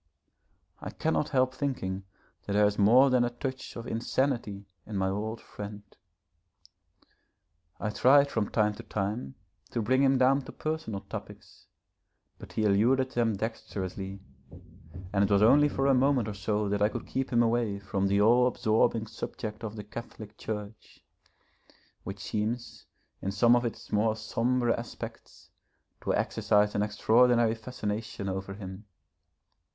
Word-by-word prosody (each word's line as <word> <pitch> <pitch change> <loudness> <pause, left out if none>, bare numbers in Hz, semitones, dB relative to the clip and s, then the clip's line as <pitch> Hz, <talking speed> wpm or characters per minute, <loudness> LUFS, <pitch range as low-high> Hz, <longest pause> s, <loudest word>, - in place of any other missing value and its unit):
I - - -6
cannot 155 -2 -1
help 130 -1 +2
thinking 100 -9 -3 0.4
that 100 - -1
there 105 0 +5
is 105 0 0
more 125 +7 +6
than 125 -1 +4
a 120 - +1
touch 130 +2 -6
of 115 - -6
insanity 115 -3 -1 0.2
in 110 - -6
my 95 0 +1
old 110 +3 -3
friend. 105 0 -8 2.0
I 105 - -2
tried 140 +5 +5
from 110 -3 -1
time 105 -2 +2
to 105 - -9
time 105 - -3 0.3
to - - -2
bring 130 +4 +2
him 135 -1 +4
down 135 +2 +4
to - - -8
personal 155 -11 -4
topics, - - -10 0.7
but - - -11
he 110 - 0
eluded 120 +6 +3
them 115 -4 +1
dexterously, 95 -3 -5 0.9
and 100 0 +3
it 100 - +1
was 100 0 +4
only 145 +6 +6
for 135 -1 -1
a 140 - +5
moment 130 -3 +3
or 105 - -3
so 105 +1 -1
that 100 0 -1
I 105 - +4
could - - -6
keep 135 0 -2
him 120 -1 +4
away 115 -3 +1
from 100 0 -1
the 100 +1 +2
all 120 +4 +5
absorbing 110 -2 +1
subject 110 0 -6
of 110 -1 -5
the 105 - -6
Catholic 110 0 -9
Church, 105 0 -7 1.0
which 95 +1 -7
seems 115 +4 -3 0.3
in 95 - -2
some 115 +5 +5
of 120 0 +1
its 115 - -6
more 110 +1 +2
sombre 120 +2 0
aspects 115 - -9 0.5
to - - +1
exercise 105 0 +2
an 105 - 0
extraordinary 115 +2 +3
fascination 110 -2 -5
over 95 +1 -4
him. 95 0 -9
110 Hz, 150 wpm, -29 LUFS, 105-125 Hz, 2.0 s, more